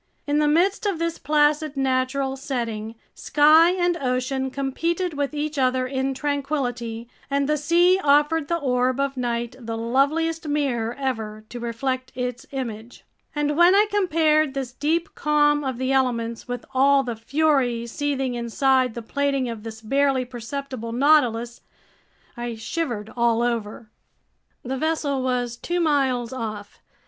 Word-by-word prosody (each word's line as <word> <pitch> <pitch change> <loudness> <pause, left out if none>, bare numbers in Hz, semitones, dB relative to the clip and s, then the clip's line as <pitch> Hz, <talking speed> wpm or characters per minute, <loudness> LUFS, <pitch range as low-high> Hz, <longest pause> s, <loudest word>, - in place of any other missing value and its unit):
In 290 0 +1
the 300 - +3
midst 375 +8 +2
of 390 -4 0
this 335 0 -2
placid 300 0 +1
natural 265 0 0
setting, 230 -5 -4 0.2
sky 310 +3 +5
and 350 -1 +1
ocean 265 -1 -1
competed 330 +7 -2
with 285 -1 -2
each 295 0 -2
other 255 0 +2
in 265 +1 -2
tranquility, 255 -5 -2 0.2
and 280 0 +1
the 300 - +2
sea 345 +5 +3
offered 295 +2 +3
the 340 - 0
orb 255 -3 0
of 275 0 0
night 240 -1 -2
the 225 -2 -5
loveliest 305 +8 0
mirror 250 -6 -1
ever 220 -6 -4
to 245 - -7
reflect 255 +2 -3
its 250 -1 -4
image. 235 -4 -6 0.3
And 295 0 0
when 345 +4 +6
I 415 +1 +5
compared 310 -7 +2
this 260 -3 -4
deep 315 +6 -1
calm 295 -1 +2
of 260 -3 -3
the 260 +1 -1
elements 235 -4 0
with 245 -1 -5
all 275 +1 +4
the 240 -3 -4
fury 255 -1 +1
seething 270 +1 -2
inside 250 +1 +1
the 235 - -6
plating 275 +1 -1
of 230 -2 -6
this 225 0 -8
barely 270 +2 +1
perceptible 245 -1 -6
Nautilus, 240 -4 +2 0.7
I 240 -1 -4
shivered 225 -3 -4
all 235 -1 +2
over. 225 -2 -3 0.7
The 265 +2 -3
vessel 295 -2 -1
was 245 -2 -1
two 345 +8 -2
miles 265 -7 +1
off. 215 -5 -6
265 Hz, 145 wpm, -23 LUFS, 240-295 Hz, 0.7 s, when